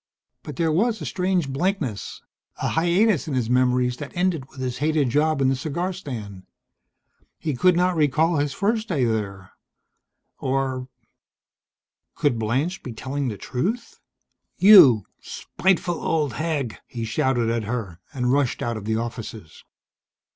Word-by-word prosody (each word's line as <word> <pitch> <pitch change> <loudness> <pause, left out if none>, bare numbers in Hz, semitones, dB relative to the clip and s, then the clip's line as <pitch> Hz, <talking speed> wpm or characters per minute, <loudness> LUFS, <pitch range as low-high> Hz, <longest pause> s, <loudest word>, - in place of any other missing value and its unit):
But 150 - -8
there 165 +3 +1
was 220 +8 +1
a - - -6
strange 180 -4 0
blankness, 135 - -2 0.3
a - - -1
hiatus 175 +2 +2
in 145 - -2
his 120 -2 -1
memories, 125 0 +2
that 145 -2 -7
ended 175 -7 0
with 135 - -14
his 130 -1 -3
hated 150 -2 +1
job 150 +1 +2
in 130 - +3
the 135 - +2
cigar 165 +7 -3
stand. 110 - -8 0.9
He 155 - -3
could 180 +8 +4
not 180 +1 +2
recall 155 +2 +2
his 145 0 0
first 220 - -1
day 150 - 0
there 100 -4 -3 0.9
or 130 -1 -1 1.3
Could 125 -6 +1
Blanche 130 +11 -1
be 125 - -7
telling 135 +4 -3
the 105 -4 -4
truth? 215 - -3 0.6
"You 145 - +8 0.2
spiteful 175 -2 -1
old 150 -6 0
hag!" 150 -7 -2
he 115 -2 -5
shouted 120 0 0
at 115 -2 -1
her, 105 -7 -4
and 125 -1 0
rushed 140 -3 0
out 120 -1 -2
of 105 - -8
the 110 0 0
offices. 110 -6 -6
135 Hz, 145 wpm, -23 LUFS, 120-170 Hz, 1.3 s, You